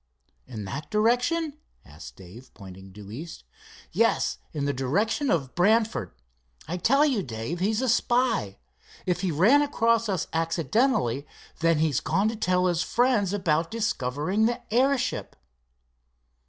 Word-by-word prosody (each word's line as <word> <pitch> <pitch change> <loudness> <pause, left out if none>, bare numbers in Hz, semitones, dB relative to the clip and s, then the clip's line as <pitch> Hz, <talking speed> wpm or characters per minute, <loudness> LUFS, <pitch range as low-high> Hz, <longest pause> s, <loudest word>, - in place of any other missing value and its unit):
"In 110 -5 -7
that 140 +10 -6
direction?" 250 +8 +1 0.3
asked 75 +2 -12
Dave, 100 +8 -14
pointing 95 -1 -12
due 100 +1 -11
east. 160 +8 -8 0.5
"Yes, 65 - +1
in 145 -2 -3
the 140 - 0
direction 200 - 0
of 135 -6 0
Brantford. 215 - +2 0.6
I 175 +4 -3
tell 275 - +3
you, 260 -9 +1
Dave, 125 +4 -5
he's 215 +6 0
a - - 0
spy. 240 - +1 0.5
If 180 -1 -1
he 190 - 0
ran 210 - +5
across 230 -5 +1
us 185 -5 -1
accidentally 165 - 0 0.3
then 165 -1 +3
he's 155 -4 +1
gone 200 +3 +1
to 225 - -4
tell 180 -4 +1
his 175 -2 +1
friends 235 -2 +1
about 165 -5 0
discovering 190 - 0
the 240 - -2
airship." 255 +1 +1
180 Hz, 140 wpm, -26 LUFS, 140-230 Hz, 0.6 s, ran